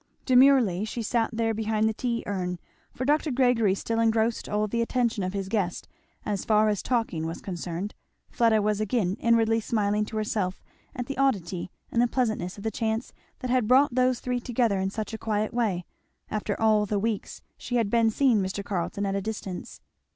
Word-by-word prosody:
Demurely 255 -8 +5
as 215 - -3
she 235 - -4
sat 225 +1 +1
there 225 0 0
behind 220 0 0
the 220 - 0
tea 235 +1 -2
urn, 180 -3 -2 0.3
for 255 - -4
Dr. 300 +2 +2
Gregory 245 -6 +3
still 225 +3 -2
engrossed 225 0 +1
all 210 +1 +1
the 235 +3 -1
attention 235 -2 0
of 185 0 -2
his 195 -1 -3
guest 190 -4 -2 0.4
as 205 -2 -2
far 215 0 +3
as 205 -2 0
talking 225 -10 -1
was 165 - -5
concerned, 180 +1 -5 0.4
Fleda 225 -3 +3
was 210 0 +1
again 205 -3 0
inwardly 230 -1 +3
smiling 210 -1 0
to 220 - -6
herself 205 -3 -2 0.3
at 250 -3 -3
the 275 +1 -5
oddity 190 -10 0 0.2
and 235 - +2
the 245 - +4
pleasantness 220 -8 -1
of 200 - -9
the 220 - -1
chance 225 +1 -2 0.3
that 255 - -2
had 250 -4 +2
brought 260 +2 +5
those 255 0 +2
three 250 -1 -2
together 235 -4 0
in 190 0 0
such 215 +2 -5
a 220 - -4
quiet 215 0 -1
way, 205 -8 0 0.5
after 210 -1 -2
all 215 -1 +3
the 205 - 0
weeks 215 0 -3
she 245 - -5
had 225 -4 +1
been 230 -1 +4
seeing 235 -2 +3
Mr. 190 +1 -3
Carleton 200 +1 -2
at 195 - -1
a 200 - -1
distance. 195 -3 -6
220 Hz, 195 wpm, -27 LUFS, 200-235 Hz, 0.5 s, Demurely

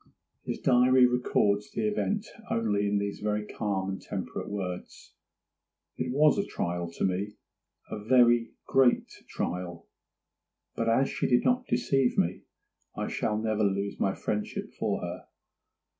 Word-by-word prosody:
His - - -4
diary 125 0 +5
records 105 -4 +1
the 215 - -1
event 210 0 -1 0.2
only 105 -3 +1
in 100 0 +1
these 100 0 -2
very 105 0 -1
calm 100 -3 -2
and 95 0 -4
temperate - - -5
words:—'It 95 +3 -8
was 150 +7 +4
a - - +2
trial 85 -1 -2
to - - -3
me—a 105 +2 -6
very 120 -1 +5 0.2
great 130 -2 +3 0.2
trial; 85 -1 -4 0.9
but 115 0 0
as 130 +4 +3
she - - -1
did 125 -1 +3
not 250 0 +2
deceive 135 -2 +1
me, 90 +2 +1 0.6
I - - -2
shall 105 - -1
never 110 -1 0
lose 100 0 -1
my 95 - +1
friendship 105 -1 -3
for - - -1
her. - - -6
105 Hz, 135 wpm, -29 LUFS, 100-125 Hz, 0.9 s, diary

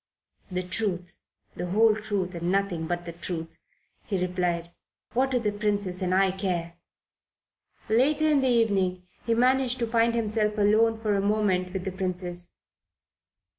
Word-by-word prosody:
"The 185 0 -2
truth, 180 -2 -3 0.4
the 175 - -4
whole 215 +4 +4
truth 205 -4 -2
and 170 +1 -2
nothing 190 -4 0
but 175 0 -3
the 170 - -6
truth," 165 -1 -6 0.4
he 195 -3 -2
replied. 180 -2 -1 0.4
"What 260 +3 +2
do 255 - +1
the 220 -4 0
Princess 205 -3 -2
and 185 -1 0
I 190 0 +4
care?" 180 -3 -2 1.1
Later 285 +7 +3
in 295 -3 +4
the 265 - +2
evening 195 -7 +1 0.2
he 230 - +3
managed 255 +1 +2
to 240 - 0
find 230 0 +2
himself 215 -1 0
alone 220 +2 +3
for 215 -2 0
a 200 - +1
moment 200 -3 +1
with 190 -1 -4
the 190 - -3
Princess. 180 -1 -4
195 Hz, 155 wpm, -27 LUFS, 180-225 Hz, 1.1 s, whole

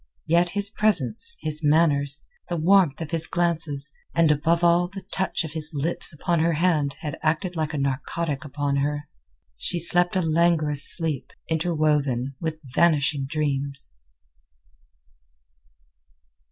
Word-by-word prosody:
Yet 170 +2 +3
his 200 0 +1
presence, 215 - +1
his 155 0 -2
manners, 145 -2 +2 0.2
the 175 - -2
warmth 170 -3 +3
of 160 - -5
his 160 -1 0
glances, 160 -5 0 0.2
and 165 -2 +4
above 165 +3 +1
all 175 +1 +4
the 195 +1 -9
touch 190 -3 0
of 155 -2 -7
his 155 -2 0
lips 155 +5 -1
upon 170 +2 -1
her 165 +1 +2
hand 150 -4 +1
had 150 -3 -5
acted 165 +4 -1
like 155 -2 -2
a - - -2
narcotic 140 +2 -2
upon 145 -1 -2
her. 145 +1 -2 0.5
She 175 - 0
slept 175 +2 +3
a 185 - +2
languorous 160 -3 +3
sleep, 160 -6 0 0.2
interwoven 150 -6 0
with 160 -1 -3
vanishing 145 0 +1
dreams. 140 - -3
155 Hz, 135 wpm, -24 LUFS, 145-170 Hz, 0.5 s, and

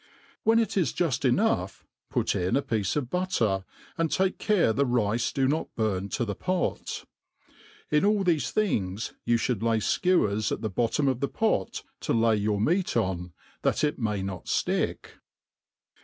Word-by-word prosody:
When 225 +1 +4
it 225 -3 +1
is 180 - +1
juil 145 -6 0
enough 120 - 0 0.2
put - - 0
in 90 +1 0
a 140 - +1
piece 110 -4 -1
of 135 -5 -2
butcer, 115 - 0 0.3
and 165 -3 +1
take 190 +3 +1
care 195 - +3
the 140 - +2
rice 120 -2 +1
do 135 -1 +1
not 155 +4 -2
burn 100 -3 -1
to 120 - 0
the 105 - -3
pot. 185 - -2 0.9
In 150 0 +3
a)l 205 0 +3
thefe 160 -7 +1
thjngs 110 - -1
you 120 - +3
fhtould 115 -1 -1
lay 115 0 +2
(kewers 110 - +1
at - - -2
the 110 -3 -2
bottom 120 +8 +1
of 130 -2 +1
the 140 - -1
pfot 215 - 0 0.2
cb 115 - +1
lay 115 -1 +4
your 105 0 0
meat 170 - +1
on, 90 -5 -1 0.3
that - - +1
it 150 - 0
may 105 -4 -1
not 95 -3 -6
flick. - - -1
120 Hz, 170 wpm, -27 LUFS, 105-165 Hz, 0.9 s, When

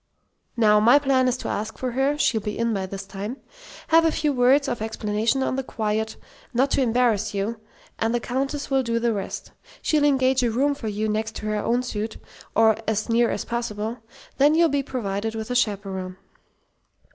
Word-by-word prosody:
"Now, 210 -2 +5
my 235 +6 +6
plan 270 -3 +2
is 250 0 +1
to - - -6
ask 215 +2 -3
for 255 -1 -3
her 270 +4 +1
(she'll 225 -6 +2
be 210 0 -4
in 230 0 0
by 190 -2 -2
this 195 +1 -7
time), 205 +6 -6 0.5
have 330 0 +6
a 325 - +3
few 305 -2 0
words 265 +3 +4
of 240 -4 -3
explanation 220 +3 0
on 260 - -1
the 270 - -1
quiet, 220 -2 -2 0.4
not 265 +3 +2
to - - +2
embarrass 225 -4 +1
you; 215 +3 -2 0.4
and 225 - +1
the 240 - +1
Countess 275 +4 -3
will 270 0 +3
do 230 -2 -1
the 230 0 +1
rest. 200 -2 -5 0.3
She'll 305 -2 +1
engage 265 -2 +3
a 240 - +2
room 275 +6 +1
for 265 -5 -6
you 215 +1 -1
next 215 +1 -2
to - - -6
her 215 0 -1
own 240 +4 0
suite, 220 -2 -4 0.4
or 220 -1 +5
as 220 +1 -1
near 235 +1 +3
as - - -3
possible; 230 -1 -3 0.4
then 290 +3 +5
you'll 335 0 +4
be 280 0 +1
provided 220 -4 -3
with 220 +2 -5
a - - -1
chaperon." 195 -5 -1
230 Hz, 200 wpm, -24 LUFS, 215-265 Hz, 0.5 s, my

